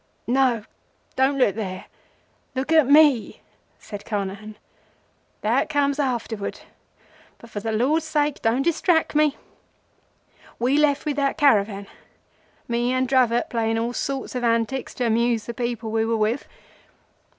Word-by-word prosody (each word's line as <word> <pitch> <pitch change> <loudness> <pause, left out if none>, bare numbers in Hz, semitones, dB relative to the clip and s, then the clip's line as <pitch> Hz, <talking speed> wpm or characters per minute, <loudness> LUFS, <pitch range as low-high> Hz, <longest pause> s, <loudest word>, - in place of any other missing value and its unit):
"No, 250 -3 +2 0.5
don't 265 +2 +2
look 250 -7 +3
there. 190 -4 -5 0.7
Look 260 +4 -2
at 315 -5 +5
me," 285 -5 +4 0.4
said 205 -1 -9
Carnehan. 205 0 -5 0.8
"That - - +1
comes 285 -1 +1
afterwards, 235 -6 -3 0.8
but 235 - -15
for 205 - -4
the 220 +2 -3
Lord's 270 +9 +1
sake 295 -2 0
don't 235 +4 +1
distrack 335 0 +1
me. 300 -1 +2 1.2
We 250 +4 +1
left 295 -1 +2
with 295 -2 -2
that 275 +1 0
caravan, 210 -9 +2 0.8
me 240 +1 0
and 255 0 +1
Dravot, 245 -2 +2
playing 225 -1 0
all 235 +2 -2
sorts 270 +1 -3
of 250 -1 -3
antics 230 +2 0
to 250 - -1
amuse 230 0 +1
the 235 - -5
people 235 -2 -3
we 220 0 +1
were 225 0 0
with. 220 +5 -1
245 Hz, 140 wpm, -23 LUFS, 225-280 Hz, 1.2 s, at